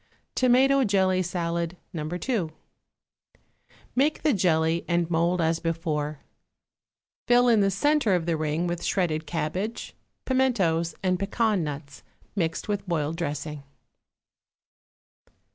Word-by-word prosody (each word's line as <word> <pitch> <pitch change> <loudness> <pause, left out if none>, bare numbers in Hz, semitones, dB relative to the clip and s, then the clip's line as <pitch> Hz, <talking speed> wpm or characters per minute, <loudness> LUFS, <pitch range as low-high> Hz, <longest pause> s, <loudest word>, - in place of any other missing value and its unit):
=Tomato 265 +2 +4
Jelly 190 -4 +2
Salad, 170 -1 -2 0.2
No. 160 -3 -3
2.= 180 +2 -2 1.5
Make 290 +5 +1
the 305 -3 +3
jelly 165 -3 +2
and 170 -1 +1
mould 170 +2 +2
as 165 0 +1
before. 155 -3 -2 1.1
Fill 245 0 +5
in 230 -3 +5
the 195 -1 +3
centre 235 +1 +2
of 170 -2 -1
the 170 -1 +1
ring 155 +2 -1
with 175 -1 -3
shredded 160 -5 0
cabbage, 175 +8 -3 0.3
pimentos 190 -12 +1
and 185 -1 +1
pecan 210 -1 +1
nuts, 145 -1 -6 0.3
mixed 165 -4 -1
with 205 -2 -2
boiled 155 -2 0
dressing. 150 -1 -4
175 Hz, 115 wpm, -26 LUFS, 160-205 Hz, 1.5 s, Fill